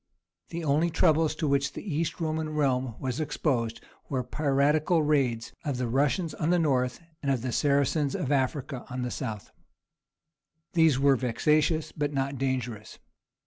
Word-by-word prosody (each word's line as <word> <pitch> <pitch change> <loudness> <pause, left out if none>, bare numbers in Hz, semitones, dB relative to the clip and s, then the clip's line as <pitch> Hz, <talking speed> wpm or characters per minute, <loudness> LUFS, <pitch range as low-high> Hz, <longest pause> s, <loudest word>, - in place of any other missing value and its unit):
The 170 0 -5
only 155 +3 +2
troubles 160 -1 +3
to 155 - -1
which 140 0 +1
the - - -7
East 165 +2 -1
Roman 160 -1 -1
realm 130 -5 0
was 130 0 -3
exposed 120 -7 -1 0.3
were 130 -3 -1
piratical 150 +5 +2
raids 130 -6 +1
of 140 -4 -2
the 125 -1 -1
Russians 145 +7 +1
on 155 - -1
the 180 - +4
north 130 -6 +1 0.2
and 135 -2 +1
the 125 +2 -3
Saracens 140 +1 +1
of 140 - -2
Africa 135 -1 -1
on 125 0 -3
the 125 - -3
south. 105 -3 -5 1.2
These 160 -6 +4
were 140 0 +4
vexatious, 150 +6 +1
but 145 -1 -2
not 135 -1 -2
dangerous. 125 -5 -3
140 Hz, 150 wpm, -28 LUFS, 130-155 Hz, 1.2 s, the